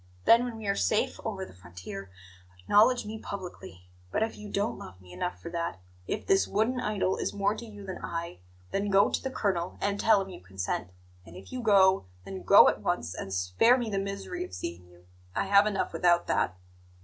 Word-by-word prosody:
Then, 235 +2 +6
when 240 -2 -5
we 220 - -8
are 200 0 +1
safe 215 - +1
over 195 -4 -3
the - - -14
frontier, 90 +2 -9 0.5
acknowledge 220 - +4
me 220 +1 -6
publicly. 175 - -8 0.2
But 215 - 0
if 225 - -3
you 210 0 -9
don't 205 +3 -1
love 90 0 -11
me 90 -1 -15
enough 180 - -3
for 170 - -8
that, 170 - -3 0.3
if 215 - -3
this 390 0 +3
wooden 225 +5 +1
idol 200 -5 0
is - - -3
more 200 0 +1
to 230 +2 -8
you 205 -2 -10
than 190 -1 -6
I, 170 - -5 0.3
then 200 +1 -1
go 200 +1 +4
to - - -1
the 265 - -3
colonel 190 -8 -1
and 200 0 -1
tell 220 -2 +5
him 195 0 -4
you 185 - -10
consent. 95 -1 -4 0.3
And 90 - -14
if 95 +1 -12
you 255 - -4
go, 190 - +4 0.2
then 95 -1 -6
go 90 - +8
at - - +1
once, 85 +3 -1
and - - -6
spare 90 - +3
me 235 -4 -3
the 195 - 0
misery 200 - -4
of 365 - -8
seeing 85 +1 -6
you. 90 0 -20 0.3
I - - 0
have 200 +1 +5
enough 200 -2 -1
without 175 -1 +3
that." 95 - 0
195 Hz, 215 wpm, -29 LUFS, -, 0.5 s, go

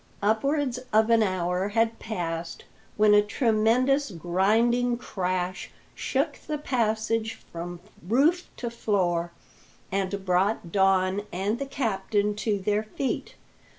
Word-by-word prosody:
Upwards 255 +4 +1
of 220 +1 +4
an 230 -1 +5
hour 185 -1 0
had 225 +2 +1
passed 165 -5 -4 0.3
when 210 0 +5
a 210 - +7
tremendous 240 +5 +2
grinding 220 +8 +1
crash 185 -5 -3 0.2
shook - - -1
the 305 - -1
passage 225 -4 0 0.2
from 175 +1 -6 0.3
roof 300 - +2
to 235 -2 -4
floor, 175 -7 0 0.6
and 195 0 -2
brought 185 -1 +1
Don 190 0 +3
and 200 +6 -1
the 275 - -3
captain 210 -5 0
to 210 0 0
their 205 +2 0
feet. 220 +5 -4
210 Hz, 115 wpm, -26 LUFS, 185-235 Hz, 0.6 s, a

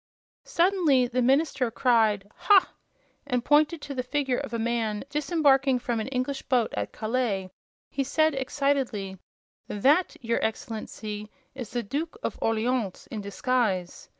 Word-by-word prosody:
Suddenly 335 -8 +3
the 250 +1 -1
minister 270 0 +2
cried, 220 -4 +2
"Ha!" 370 +2 +4 0.5
and, 250 -3 -1
pointing 300 +2 +4
to 285 - -6
the 255 - -1
figure 265 0 -1
of - - -6
a 230 - -2
man 225 -2 -1
disembarking 280 -3 +3
from 240 -2 -2
an 220 - -3
English 270 +1 -2
boat 250 -4 +1
at - - -3
Calais, 215 -5 -2 0.4
he 275 - -1
said, 310 +3 +2
excitedly: 265 -8 -1 0.5
"That, 290 - +2
your 230 -3 -1
Excellency, 215 -1 -4 0.2
is 250 -5 -7
the 240 -1 -2
Duke 315 - -4
of - - -3
Orleans, 225 -2 -1
in 215 - -4
disguise! 200 -4 -1
250 Hz, 140 wpm, -27 LUFS, 220-280 Hz, 0.5 s, Ha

